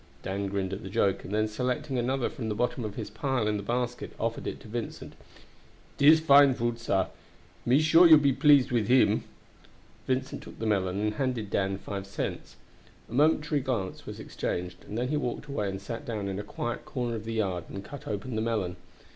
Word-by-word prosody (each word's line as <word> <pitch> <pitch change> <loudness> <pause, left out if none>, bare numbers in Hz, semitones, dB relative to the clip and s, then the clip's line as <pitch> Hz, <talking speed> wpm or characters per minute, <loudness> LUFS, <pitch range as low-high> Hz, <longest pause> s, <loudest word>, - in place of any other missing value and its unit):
Dan 100 +1 -2
grinned 95 -1 -2
at 95 - -5
the 95 - -7
joke, 100 0 +1
and - - -8
then 110 +1 +1
selecting 125 +4 -2
another 130 +1 0
from 115 -3 -5
the 105 - -1
bottom 120 +2 -1
of 105 -2 -5
his 110 -3 -5
pile 125 0 -1
in 105 -1 +1
the - - -4
basket, 120 +3 -2
offered 115 0 -2
it - - -4
to - - -12
Vincent. 115 +1 -5 0.9
"Dis 155 +3 +8
fine 140 -3 +6
fruit, 120 0 -1
sah. 95 -5 0 0.6
Me 130 +4 +5
sure 165 +3 +7
you 160 -1 +10 0.2
please 145 -1 +5
with 115 -3 +1
him!" 130 +1 +4 0.8
Vincent 130 0 -1
took - - -12
the 115 - -4
melon 95 -3 +1
and 105 0 0
handed 115 -4 -2
Dan 95 0 0
five 100 0 -6
cents. 100 - -5 0.6
A - - -7
momentary 150 +1 +3
glance 115 -8 -3
was - - -7
exchanged, 90 0 -4
and 105 - -5
then 125 +2 -1
he 150 - +1
walked 130 -1 -3
away 125 -9 -2
and 95 0 -4
sat 115 +6 -6
down 110 -7 -3
in 95 0 -3
a - - -4
quiet 120 +3 -4
corner 120 -2 -3
of 110 - -5
the 115 - -3
yard 95 -6 -1
and 100 0 -7
cut 140 -1 -9
open 105 +4 -4
the 110 - 0
melon. 105 -6 -1
115 Hz, 205 wpm, -28 LUFS, 100-130 Hz, 0.9 s, you